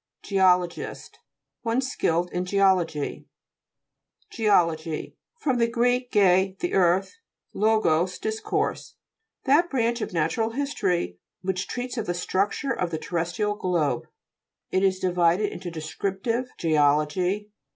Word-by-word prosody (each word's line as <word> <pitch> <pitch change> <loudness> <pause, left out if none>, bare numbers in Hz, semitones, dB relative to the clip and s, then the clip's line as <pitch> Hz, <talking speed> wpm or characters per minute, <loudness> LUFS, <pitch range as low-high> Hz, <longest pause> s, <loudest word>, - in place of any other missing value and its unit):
GE'OLOGIST 180 -3 +1 0.4
One 230 +1 0
skilled 175 -9 0
in 180 - -1
geology. 185 -6 +1 1.0
GE'OLOGT 165 -7 +1 0.2
fr. 310 - 0
gr. 235 0 +1 0.3
ge, 190 -1 +3
the 355 - -3
earth, 190 - +2 0.4
lo 220 +2 +3
gos, 175 0 +1
discourse. 220 0 -2 0.5
That 300 +6 +4
branch 235 -2 0
of - - -3
natural 175 +7 0
history, 180 - -1 0.2
which 185 0 -2
treats 250 0 -4
of 220 - -4
the 175 - -1
structure 195 +9 0
of 180 - -2
the 160 - -3
terrestrial 175 +6 -2
globe. 170 -10 -1 0.6
It 185 - +2
is 190 -1 +2
divided 180 +2 +2
into 175 0 -6
descriptive 195 +9 -3
geology? 160 +6 +1
190 Hz, 115 wpm, -25 LUFS, 170-220 Hz, 1.0 s, That